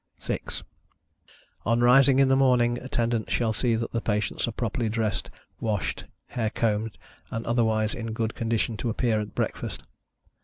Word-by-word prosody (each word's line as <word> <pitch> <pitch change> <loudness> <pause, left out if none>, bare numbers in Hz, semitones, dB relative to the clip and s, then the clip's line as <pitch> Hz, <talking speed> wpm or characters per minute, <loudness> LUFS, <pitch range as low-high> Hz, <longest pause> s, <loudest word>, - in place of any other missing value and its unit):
6. - - -4 1.0
On 115 +2 +2
rising 130 +2 +6
in 135 -1 +5
the 135 - +4
morning, 125 -3 +3
Attendants 115 -3 -1
shall 115 -2 +1
see 115 +1 +1
that 115 0 -2
the 115 - -1
patients 105 +1 0
are - - -1
properly 115 0 -1
dressed, 110 -1 -1 0.3
washed, 105 -4 -2 0.2
hair 110 -3 -1
combed, 110 -1 -1 0.3
and 115 - -4
otherwise 110 -2 +2
in 115 -1 -4
good 115 0 -1
condition 115 -1 -1
to 120 - -2
appear 110 -1 +1
at 105 - -7
breakfast. - - -3
115 Hz, 155 wpm, -26 LUFS, 110-120 Hz, 1.0 s, rising